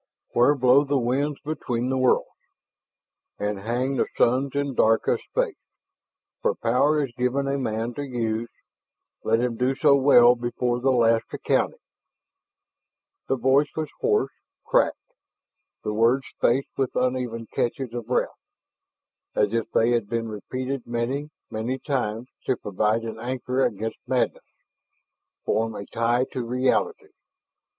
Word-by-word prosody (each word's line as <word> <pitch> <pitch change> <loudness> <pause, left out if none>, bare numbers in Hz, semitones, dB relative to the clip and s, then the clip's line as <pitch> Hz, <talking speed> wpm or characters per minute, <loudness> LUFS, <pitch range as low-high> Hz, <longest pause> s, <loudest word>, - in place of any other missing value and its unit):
"... - - -64
where 125 +5 +5
blow 130 +1 +5
the 140 0 0
winds 135 +4 0
between 125 -5 -2
the 130 - 0
worlds, 130 -1 +3 1.1
And 105 -1 -2
hang 125 +6 -1
the - - +1
suns 130 +3 +2
in 140 -1 -1
dark 110 -2 +3
of - - +2
space. - - -1 0.8
For 480 0 +1
Power 150 +1 +2
is 135 - -4
given 125 +3 0
a 140 0 0
man 115 -1 -2
to 145 - -5
use. 115 -4 -2 0.7
Let 115 +1 +2
him 120 -2 -1
do 130 +2 +1
so 140 +1 +5
well 125 -3 +7
before 120 0 -1
the 130 +2 +1
last 115 -3 +3
accounting - - 0 0.8
" - - -57
The - - +1
voice 135 +4 +3
was 155 -2 -2
hoarse, 430 -2 +1 0.3
cracked, - - +2 0.9
the 105 - -2
words 120 +5 +3
spaced 130 +3 +1
with 135 -2 -1
uneven 125 -2 -1
catches 120 0 -2
of 120 -2 -5
breath, 125 - +1 1.1
as 105 0 +2
if 115 -1 -1
they 115 +2 +2
had 115 -4 0
been 115 0 -1
repeated 130 +5 -5
many, 125 +5 -2 0.2
many 115 +4 -2
times 125 -4 -2 0.2
to 130 - +2
provide 105 +3 0
an 110 -1 -6
anchor 125 +2 -1
against 110 +2 -2
madness, - - 0 1.0
form 110 0 0
a 100 - -6
tie 120 +4 +1
to 125 - -3
reality. 130 - 0
125 Hz, 145 wpm, -25 LUFS, 115-135 Hz, 1.1 s, well